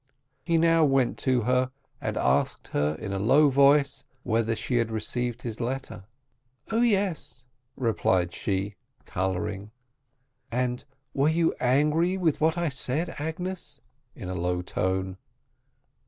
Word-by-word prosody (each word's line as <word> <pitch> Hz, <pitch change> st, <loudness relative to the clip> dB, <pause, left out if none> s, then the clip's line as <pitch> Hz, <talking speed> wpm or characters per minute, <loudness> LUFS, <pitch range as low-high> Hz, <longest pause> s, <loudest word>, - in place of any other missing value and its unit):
He 170 Hz, -1 st, +2 dB
now 165 Hz, 0 st, +4 dB
went 135 Hz, -4 st, +2 dB
to 130 Hz, -2 st, +1 dB
her, 125 Hz, +2 st, +1 dB, 0.3 s
and -, -, -3 dB
asked 65 Hz, -, 0 dB
her, 75 Hz, +1 st, 0 dB
in 100 Hz, +5 st, -5 dB
a 95 Hz, -, -2 dB
low 135 Hz, +8 st, +5 dB
voice, 140 Hz, +1 st, +4 dB, 0.2 s
"whether 115 Hz, -1 st, +1 dB
she 125 Hz, +2 st, -1 dB
had 115 Hz, -1 st, +1 dB
received 120 Hz, +2 st, -1 dB
his 115 Hz, -3 st, -5 dB
letter?" 125 Hz, -5 st, -4 dB, 0.7 s
"Oh, 225 Hz, +1 st, +2 dB
yes!" 200 Hz, -, 0 dB, 0.3 s
replied 95 Hz, -7 st, +1 dB
she, 100 Hz, 0 st, -2 dB, 0.3 s
colouring. 95 Hz, +2 st, -3 dB, 0.8 s
"And 125 Hz, 0 st, -1 dB, 0.3 s
were 140 Hz, +2 st, +2 dB
you 165 Hz, +1 st, +2 dB
angry 150 Hz, +8 st, +2 dB
with 165 Hz, -6 st, 0 dB
what 160 Hz, +2 st, +2 dB
I 170 Hz, 0 st, 0 dB
said, 140 Hz, +5 st, 0 dB
Agnes?" 160 Hz, -1 st, -5 dB, 0.4 s
in 95 Hz, -, -8 dB
a 95 Hz, -, -3 dB
low 90 Hz, 0 st, -1 dB
tone. 95 Hz, +1 st, -2 dB
125 Hz, 135 wpm, -27 LUFS, 105-155 Hz, 0.8 s, low